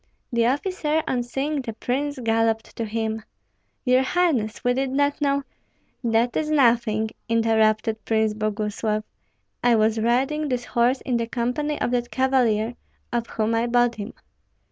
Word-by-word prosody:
The 235 0 +3
officer, 310 +2 0
on 250 - 0
seeing 275 +4 -2
the 230 -3 -5
prince, 280 +5 -2
galloped 225 -2 0
to 230 - -2
him, 220 0 -2 0.6
"Your 255 0 +4
highness, 265 -8 0
we 245 0 +3
did 265 +1 -1
not 285 +2 0
know 280 -1 +1 0.3
" - - -43
"That 235 +2 +2
is 310 -1 0
nothing!" 230 -6 +3 0.2
interrupted 220 -1 +2
Prince 220 -1 +1
Boguslav. 215 0 -2 0.6
"I 240 -1 +5
was 220 0 +2
riding 270 +7 +1
this 245 -1 -1
horse 245 +3 +1
in 250 -3 0
the 230 -1 -2
company 250 +6 -2
of - - 0
that 240 -1 0
cavalier, 245 -4 +2 0.4
of 235 -1 -1
whom 220 +1 -1
I 230 +1 +1
bought 240 0 +3
him." 215 +1 -7
240 Hz, 155 wpm, -24 LUFS, 225-265 Hz, 0.6 s, I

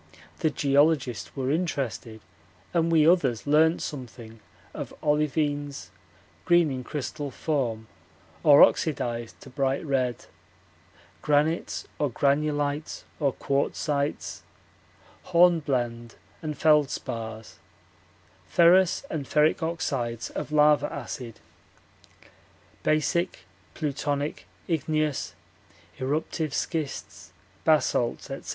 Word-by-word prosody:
The 160 - +2
geologists 140 - +1
were 130 0 -1
interested, 135 - -3 0.5
and 165 -1 +2
we 160 -2 +5
others 140 -10 +3
learnt 160 +3 +3
something 120 -5 -8 0.3
of - - -7
olivines, 145 -1 -1 0.5
green 175 -3 +4
in 130 -1 -4
crystal 145 +2 -4
form 125 -7 -2 0.6
or 145 -3 +8
oxidized 120 -6 0
to 135 - -12
bright 135 +3 -1
red, 130 -4 -1 1.0
granites 150 +3 0
or 145 - +1
granulites 145 +3 0 0.2
or 140 -3 +2
quartzites, 140 +2 -2 0.8
hornblende 135 -10 +2 0.3
and 155 -2 -4
feldspars, 115 -7 0 0.9
ferrous 175 +4 +4
and 145 -4 -3
ferric 150 +3 +3
oxides 135 -8 -2
of - - -5
lava 150 0 +4
acid, 125 -3 -7 1.4
basic, 170 +4 0 0.3
plutonic, 145 -1 -3 0.2
igneous, 155 -2 -1 0.6
eruptive 150 +2 -2
schists, 155 -5 -4 0.3
basalts 145 -6 +1
&c. - - -8
145 Hz, 90 wpm, -26 LUFS, 130-155 Hz, 1.4 s, or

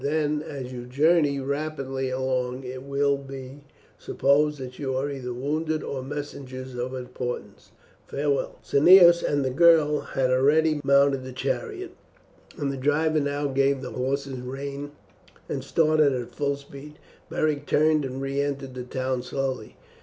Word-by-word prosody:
"Then 150 0 0
as 135 -4 -7
you 120 -1 -7
journey 145 +2 +3
rapidly 135 -1 -3
along 130 0 -2
it 130 0 -6
will 140 +1 +1
be 135 +1 -9 0.3
supposed 150 +2 +2
that 125 -1 -8
you 135 -3 -2
are 140 +2 -1
either 130 -3 -5
wounded 155 +5 -2
or 135 - -4
messengers 130 -2 -6
of 125 +1 -4
importance. 125 -1 -6 0.4
Farewell!" 140 -1 -1
Cneius 170 +3 +7
and 145 -2 0
the 130 - 0
girl 155 0 +5
had 130 -1 -1
already 150 +4 +3
mounted 140 -1 +4
the 130 - -7
chariot, 375 - -3 0.7
and 140 -2 -1
the 135 - -5
driver 155 +3 +2
now 145 0 -1
gave 135 0 +1
the 125 - -6
horses 135 +1 -2
rein 140 +3 -6 0.5
and - - -3
started 155 -3 +3
at 125 -2 -4
full 140 -1 0
speed. 140 +1 -12 0.3
Beric 150 -2 -1
turned 155 0 +3
and 135 0 -4
re 135 +1 -1
entered 140 -2 -3
the 125 - -5
town 130 0 -2
slowly. 130 -3 -4
140 Hz, 150 wpm, -25 LUFS, 130-150 Hz, 0.7 s, Cneius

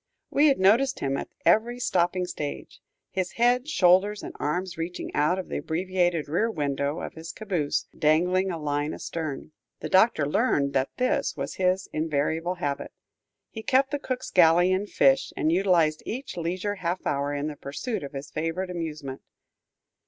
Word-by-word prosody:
We 295 +2 +5
had 275 - +4
noticed 230 +8 +3
him 135 0 -1
at - - -4 0.2
every 235 +3 +3
stopping 180 -4 +1
stage, 150 -4 -6 0.3
his 185 -1 -2
head, 245 +3 +2
shoulders, 195 - +3
and - - -7
arms 175 +4 -2
reaching 165 +2 -5
out 155 +5 +2
of 190 - -5
the - - -3
abbreviated 175 -1 0
rear 180 +10 +1
window 145 -3 -2
of - - -6
his 160 0 -8
caboose, 180 -9 -2
dangling 180 +5 +2
a 170 - -3
line 145 0 -2
astern. 155 -3 -5 0.3
The - - -5
Doctor 190 -6 +4
learned 140 -1 +1
that 135 0 +1
this 255 -10 0
was 140 0 -4
his 185 0 +1
invariable 160 +3 -1
habit. 145 -5 -3 0.6
He 220 - -6
kept 265 +4 +2
the 290 - -1
cook's 255 -2 -4
galley 175 +1 +5
in 190 +2 0
fish, 135 -8 +3
and 155 - +2
utilized 170 -4 +3
each 255 0 -5
leisure 185 +4 -2
half 180 0 -3
hour 140 0 0
in 145 0 -2
the 155 -1 -4
pursuit 145 - -4
of 140 0 -7
his 140 0 -7
favorite 165 +4 -2
amusement. 155 -6 -5
175 Hz, 165 wpm, -26 LUFS, 150-190 Hz, 0.6 s, We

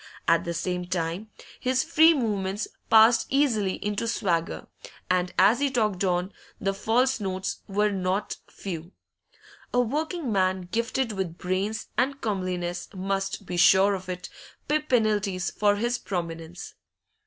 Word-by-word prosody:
At 165 0 +3
the 170 - -2
same 180 +1 -2
time, 175 +3 -3 0.3
his 255 +2 +1
free 320 0 +5
movements 205 -5 -1 0.2
passed 225 +1 +6
easily 230 -9 +2
into 210 +2 -1
swagger, 175 -7 -1 0.5
and 180 0 +1
as 210 +6 +5
he 285 0 +2
talked 215 -7 0
on, 180 +1 0 0.3
the 195 0 0
false 240 +6 +1
notes 190 -2 -3
were 210 +1 +1
not 190 +1 -1
few. 175 -2 -7 0.8
A 245 - +2
working 295 +3 -1
man 190 -1 +1
gifted 235 +2 0
with 190 -5 -4
brains 190 +5 -2
and 275 +2 +1
comeliness 180 -5 -3
must, 195 +1 -2
be 180 - -4
sure 190 +3 +6
of 185 -1 -5
it, 180 -1 -5 0.4
pay 300 +1 +2
penalties 215 - +1
for 205 -1 +2
his 240 +4 -1
prominence. 170 -2 -5
195 Hz, 140 wpm, -26 LUFS, 185-230 Hz, 0.8 s, passed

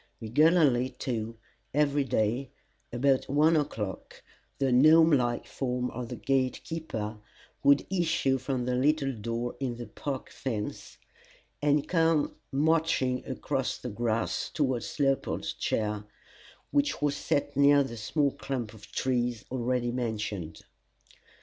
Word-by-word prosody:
Regularly 130 +1 +3
too 115 -2 -3 0.4
every 145 -1 +3
day, 120 +1 0 0.4
about 130 +2 +1
one 155 +4 +4
o'clock, 110 - -3 0.3
the 135 -2 +1
gnome 155 +6 +7
like 120 -4 +1
form 125 -1 -2
of 120 -1 -6
the - - -4
gate 130 -2 0
keeper 110 -10 -5 0.4
would 140 0 +5
issue 160 -7 +1
from 130 -1 -2
the 125 - 0
little 135 +1 +2
door 115 +2 -3
in 125 -4 -2
the 120 - -6
park 135 +1 -5
fence, 110 -6 -5 0.6
and 145 0 +2
come 165 -3 +2 0.2
marching 150 -3 +1
across - - -2
the - - -6
grass 115 +1 -1
towards 130 -5 -1
Leopold's 135 -1 0
chair, 105 -1 -2 0.7
which 290 0 +1
was 145 -1 +1
set 145 0 -1
near 140 +1 +6
the 135 -3 -6
small 140 +6 0
clump 125 -6 -4
of 105 -1 -14
trees 120 -3 -1
already 125 -1 0
mentioned. 105 -9 -3
130 Hz, 125 wpm, -29 LUFS, 120-145 Hz, 0.7 s, gnome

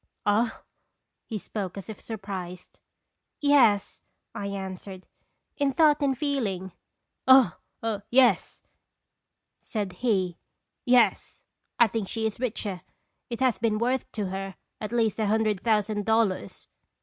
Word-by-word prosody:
" - - -53
Ah?" 220 +3 +1 0.6
He 220 - -3
spoke 200 -2 -5
as 195 - -7
if 220 - -8
surprised. 190 -5 -7 0.6
"Yes," 260 - +3 0.3
1 200 -1 -5
answered; 190 -1 -6 0.5
"in 280 -2 +1
thought 300 +1 +4
and 270 -2 +1
feeling." 220 - -2 0.3
" - - -55
Oh 260 -9 +7 0.6
yes," 245 -6 +3 1.0
said 205 -5 -4
he; 185 -5 0 0.2
" - - -56
yes, 245 -1 +2 0.3
I 235 - +7
think 220 -2 -3
she 225 +2 -2
is 220 0 -2
richer. 210 -6 -3 0.5
It 235 +1 -5
has 255 -4 +2
been 220 -2 +1
worth 250 +4 -1
to 205 -4 -2
her 195 0 -5 0.2
at 215 - -5
least 230 -3 +1
a 215 - +1
hundred 215 -2 +1
thousand 210 -2 +1
dollars." 220 -4 0
215 Hz, 135 wpm, -27 LUFS, 195-240 Hz, 1.0 s, Oh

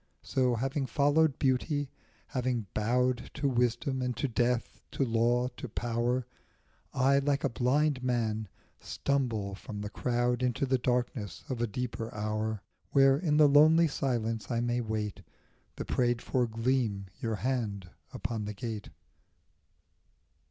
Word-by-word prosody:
So, 125 -2 +1
having 135 +3 -1
followed 145 +1 +3
beauty, 140 +1 0 0.4
having 125 -3 -1
bowed 125 +3 +1
To 145 -1 0
wisdom 125 +2 0
and 125 -1 -2
to 140 - 0
death, 120 0 0
to 135 - +1
law, 120 +1 +2
to 130 - -6
power, 120 +2 -1 0.7
I 135 +1 +3
like 140 0 0
a 140 - +2
blind 130 +3 +1
man 110 -4 0 0.3
stumble 115 -8 -1
from 100 +1 -7
the 105 0 -5
crowd 120 0 0
Into 125 +3 +1
the 130 -1 +1
darkness 120 -4 -1
of 125 -3 -2
a 120 - +1
deeper 115 0 -4
hour, 110 0 -2 0.3
Where 135 0 +5
in 150 -4 +1
the 150 -1 +7
lonely 155 +4 +6
silence 115 -6 -2
I 120 -2 0
may 120 +1 0
wait 110 -3 -3 0.5
The - - -5
prayed 120 -1 +1
for 125 0 0
gleam 115 -3 0
your 115 -1 -1
hand 105 -5 -2 0.2
upon 110 -1 -3
the 105 0 -5
gate. 110 -2 -5
125 Hz, 140 wpm, -30 LUFS, 115-135 Hz, 0.7 s, the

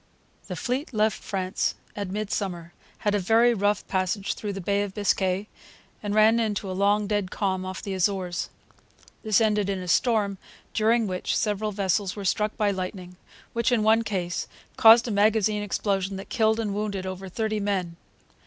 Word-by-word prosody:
The - - -4
fleet 260 +2 -3
left 215 0 +1
France 190 -1 -2 0.2
at 200 -2 -4
midsummer, 190 -4 -3 0.3
had 205 - +3
a 205 - +2
very 225 +5 +4
rough 205 -1 0
passage 190 +1 -1
through 205 -2 -5
the 195 - -5
Bay 200 +2 0
of 200 -2 -4
Biscay, 195 -1 0 0.5
and 205 0 -2
ran 220 +2 +5
into 205 -4 -1
a - - -2
long, 205 +2 +2
dead 205 -2 -1
calm 190 -2 -1
off 185 0 -6
the 200 - -4
Azores. 185 -2 -1 0.7
This 215 -2 +3
ended 210 -3 +2
in 195 - -1
a 180 -1 -6
storm, 200 0 +2 0.3
during 225 +1 +3
which 185 -2 -1
several 210 0 -1
vessels 195 -1 0
were 200 -2 -6
struck 210 +3 0
by 210 -1 +2
lightning, 185 -1 -5 0.4
which, 235 +1 +1
in 230 -3 +2
one 220 +1 +4
case, 185 -5 -2 0.3
caused 230 +2 +7
a - - -2
magazine 210 0 +2
explosion 195 -1 -1
that 195 - -9
killed 220 -1 +2
and 210 -3 -1
wounded 200 -2 -3
over 190 0 -6
thirty 215 +2 -2
men. 190 -4 -1
205 Hz, 175 wpm, -26 LUFS, 190-215 Hz, 0.7 s, caused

